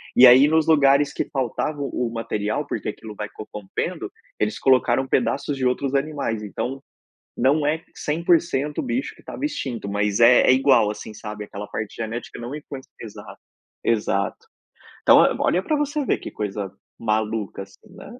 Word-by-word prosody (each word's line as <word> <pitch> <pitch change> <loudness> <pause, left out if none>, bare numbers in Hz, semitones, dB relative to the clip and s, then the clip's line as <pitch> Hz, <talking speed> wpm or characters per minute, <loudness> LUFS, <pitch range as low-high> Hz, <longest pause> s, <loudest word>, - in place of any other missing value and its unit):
e 125 - +9
aí 130 +4 +8
nos 160 +1 +2
lugares 140 -2 +4
que - - -2
faltava 135 +3 -2
o 125 -3 -2
o - - -6
material, 110 -2 -2
porque - - -3
aquilo 110 -2 -8
vai 105 0 -5
corrompendo, 105 - -5 0.3
eles 215 - 0
colocaram 130 0 +3
pedaços 130 +4 0
de 130 - -1
outros 130 +2 0
animais, 140 -6 -1
então, 130 +6 -4 0.6
não 145 +3 +2
é 160 +2 -1
100% 155 -2 0
o - - -3
bicho 260 +2 -2
que - - -19
estava - - -7
extinto, 125 - -3
mas 105 0 0
é 120 +1 +7
é - - +8
igual, 130 -5 +4
assim, 105 +1 -8
sabe, 105 0 -7
aquela 105 0 -8
parte 110 0 -5
genética 115 +1 -6
não 120 +4 -6
influencia 140 -3 -9
exato 105 - -11 0.4
exato. 105 -3 0 0.7
Então, - - +7
ó, - - +5
olha 185 +2 +2
pra 310 - 0
você 295 0 -1
ver - - +1
que - - -7
coisa, 100 -2 -4 0.3
maluca, 110 -2 -1
assim, 100 0 -19
né, 235 - -11
125 Hz, 170 wpm, -23 LUFS, 105-145 Hz, 0.7 s, e